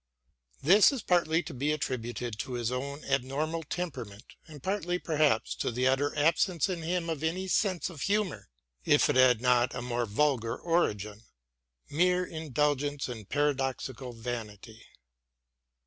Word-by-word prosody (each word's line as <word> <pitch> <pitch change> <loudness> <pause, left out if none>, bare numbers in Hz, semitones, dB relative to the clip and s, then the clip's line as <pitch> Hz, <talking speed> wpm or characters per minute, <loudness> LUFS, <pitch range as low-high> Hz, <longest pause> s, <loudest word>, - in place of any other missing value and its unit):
This 195 - +7
is 265 -6 -4
partly 170 -2 +2
to - - -8
be 140 +4 0
attributed 120 -5 -3
to 125 +3 -4
his 120 -1 -1
own 140 +3 -4
abnormal 140 +5 -1
temperament 135 - -5 0.2
and 150 -4 -12
partly 185 -3 -1
perhaps 150 -9 +1
to - - -1
the 125 +2 -1
utter 140 +3 +1
absence 165 +4 +2
in 180 -3 -3
him 170 +1 -1
of 160 -3 -3
any 180 +4 -1
sense 185 -1 +1
of 165 -6 -9
humour, 205 - -1 0.3
if - - +4
it - - -2
had 130 -3 +5
not 125 -1 +3
a 125 - -3
more 120 -1 -1
vulgar 115 0 +1
origin, 105 - -1 0.7
mere 180 +3 +2
indulgence 145 -3 -1
in 115 -4 -7
paradoxical 135 -2 -1
vanity. 115 -2 -7
140 Hz, 145 wpm, -29 LUFS, 120-165 Hz, 0.7 s, This